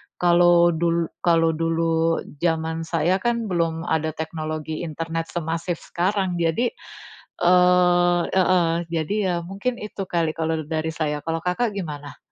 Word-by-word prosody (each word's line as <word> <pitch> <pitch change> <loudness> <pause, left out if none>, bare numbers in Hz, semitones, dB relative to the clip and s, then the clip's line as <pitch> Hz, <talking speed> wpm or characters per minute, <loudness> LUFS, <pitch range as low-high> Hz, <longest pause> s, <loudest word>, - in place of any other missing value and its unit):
Kalau 175 0 +5
dul 170 0 0
kalau 165 -1 +3
dulu 165 0 0 0.2
jaman 160 0 -1
saya 170 +3 +1
kan 235 -1 -1
belum 165 -2 0
ada 160 -2 -1
teknologi 155 -1 -4
internet 165 0 -4
semasif 165 +1 -3 0.2
sekarang 185 0 0
jadi, 170 +9 +1 0.7
eee, 180 0 +4
heeh, 185 -2 +3 0.2
jadi 165 +3 -1
ya 185 -2 0
mungkin 200 +7 -3
itu 210 -1 -6
kali 165 -2 +1
kalau 160 -1 -2
dari 160 0 -2
saya, 150 -2 -2
kalau 165 0 -2
Kakak 180 +8 -1
gimana? 150 -8 -7
165 Hz, 130 wpm, -23 LUFS, 160-180 Hz, 0.7 s, Kalau